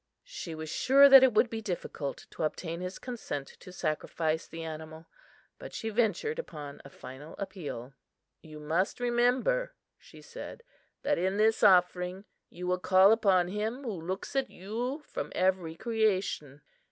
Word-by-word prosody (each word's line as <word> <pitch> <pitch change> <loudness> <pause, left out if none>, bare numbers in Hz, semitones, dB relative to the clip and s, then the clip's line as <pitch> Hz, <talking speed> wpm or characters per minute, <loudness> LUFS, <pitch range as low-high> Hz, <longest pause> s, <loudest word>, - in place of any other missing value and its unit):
She 345 - -7
was 155 0 -6
sure 275 - +6
that 270 -1 +11
it 260 -4 +4
would 235 - +5
be 225 -1 -5
difficult 175 -7 -5
to - - -8
obtain 165 +2 -3
his 180 +1 -5
consent 215 - -5
to 185 - -12
sacrifice 160 -1 -2
the 165 0 -7
animal, 160 0 -8 0.5
but - - -9
she 225 - -3
ventured 230 - 0
upon 145 - -7
a 140 - -11
final 135 +4 -11
appeal. 150 - -6 0.5
"You 155 -1 -11
must 165 +9 -1
remember," 245 - +1 0.2
she - - -16
said, 485 0 -9 0.4
"that 290 - +1
in 190 +3 0
this 220 +1 +3
offering 180 +1 +3 0.2
you 180 +2 -8
will 180 0 0
call 185 +2 +6
upon 190 -5 +3
him 220 +7 -3
who 240 - -3
looks 185 +9 -5
at 270 -1 +1
you 240 - -4
from - - -5
every 185 -3 +1
creation. 190 - -1
185 Hz, 155 wpm, -30 LUFS, 160-230 Hz, 0.5 s, that